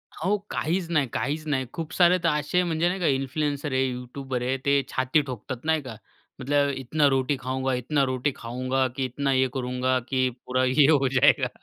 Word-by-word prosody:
अहो 195 +6 0
काहीच 170 +2 -1
नाही, 150 -6 +1
काहीच 155 +4 -2
नाही. 135 -3 0
खूप 165 +1 -5
सारे 180 0 +5
तर 165 - +4
असे 150 +4 +1
म्हणजे 165 -1 0
नाही 185 +2 -3
का? 175 - -1
इन्फ्लुएन्सर 145 +2 -1
आहे 130 0 +2
यूट्यूबर 125 +1 -5
आहे, 130 +2 -1
ते 140 0 +3
छाती 130 +4 +1
ठोकतात, 130 -2 -6
नाही 160 -1 +2
का, 125 -5 -8 0.5
मतलब 140 +2 +2
इतना 145 +3 +1
रोटी 135 +2 0
खाऊंगा, 130 +1 -1
इतना 135 +3 0
रोटी 130 +3 0
खाऊंगा, 130 +3 -1
की 130 +1 -3
इतना 135 +2 -2
ये 130 0 +3
करूंगा 125 0 0
की 130 -1 +1 0.2
पुरा 130 0 0
ये 135 +2 +4
हो 140 -3 +3
जायेगा. 135 0 +4
135 Hz, 190 wpm, -25 LUFS, 130-150 Hz, 0.5 s, सारे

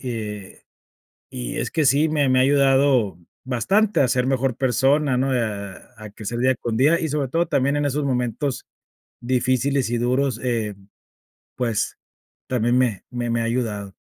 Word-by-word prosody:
y, 130 - -4
eh, 105 -4 -7 0.7
y - - -5
es - - -2
que 155 -3 +1
sí, 145 +4 +4
me 150 -3 +1
me 130 0 +3
ha - - +5
ayudado 135 -6 +3 0.3
bastante 195 - +1
a 130 - +2
ser 125 +1 +1
mejor 130 -2 0
persona, 135 +2 +2
¿no? 135 +2 0
A 105 -5 -2 0.2
a 110 -1 -10
crecer 110 +3 -6
día 130 +2 +3
con 115 -2 -3
día, 150 +7 +3
y 160 - -1
sobre 145 -2 -1
todo 165 +6 0
también 140 -3 +1
en 145 0 0
esos 145 +1 -1
momentos 125 +1 -2 0.5
difíciles 130 +1 0
y 120 - 0
duros, 125 +1 0
eh, 115 -5 -2 0.8
pues, 115 -4 -2 0.5
también 120 0 +1
me 120 -7 0
me 120 -1 -3
me 115 0 0
ha - - -1
ayudado. 110 -5 -2
125 Hz, 170 wpm, -22 LUFS, 115-140 Hz, 0.8 s, ha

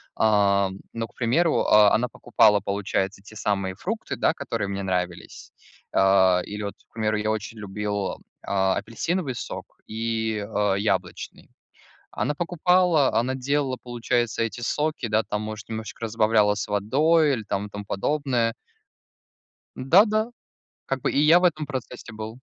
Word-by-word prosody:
А, 100 -3 +3 0.2
но, 115 -1 -4
к - - -27
примеру, 155 +8 +2
а, 105 -1 +5
она 125 +2 0
покупала, 110 -3 +3
получается, 100 0 -2
те 110 +2 -13
самые 100 -3 -1
фрукты, 215 - -4
да, - - +2
которые 115 -7 -3
мне 100 0 -4
нравились. 90 -2 -4 0.4
А, 95 -2 +4
или 105 +1 -6
вот, 100 - -5
к - - -43
примеру, 110 -1 0
я 105 +1 0
очень 110 +1 -5
любил, 105 -1 -3 0.3
а, 95 -1 +1
апельсиновый 130 - -2
сок - - -7
и, 110 -1 -2
а, 105 -2 0
яблочный. 105 +2 -3 0.6
Она 150 - -1
покупала, 175 -2 +2
она 130 +3 +1
делала, 135 0 -1
получается, 120 -1 -1
эти 115 0 -2
соки, 150 +3 -1
да, 110 0 +2
там, 105 -1 -4
может, 110 0 -7
немножечко 110 +1 -5
разбавляла 110 -2 +3
с 105 - -4
водой 145 +10 +3
или 115 -4 -3
там 105 0 -3
тому 105 0 -7
подобное. 120 +1 0 1.2
Да 165 +11 +5
да. 215 +2 0 0.6
Как 135 -1 -2
бы - - 0
и - - 0
я 155 +4 +6
в - - 0
этом 155 -4 +1
процессе 130 -4 -7
был. 110 +2 -7
110 Hz, 150 wpm, -24 LUFS, 105-135 Hz, 1.2 s, я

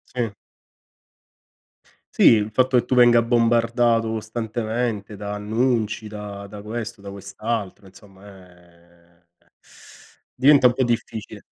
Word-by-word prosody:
Sì. 120 -2 -1 1.8
Sì, - - +1
il 105 -1 +1
fatto 130 +3 +2
che 120 - +1
tu 130 - -1
venga 120 -1 +6
bombardato 115 -1 +2
costantemente 110 -1 -3
da 105 0 -6
annunci, 110 +1 -1
da 105 -1 -8
da 100 0 -10
questo, 110 0 -6
da 100 0 -9
quest'altro, 100 +1 -5
insomma, 95 +1 -17
ehm, 85 -2 -20 1.1
diventa 135 0 +6
un 125 - +1
po' 130 +1 0
difficile. 115 -2 -4
110 Hz, 115 wpm, -22 LUFS, 100-120 Hz, 1.8 s, venga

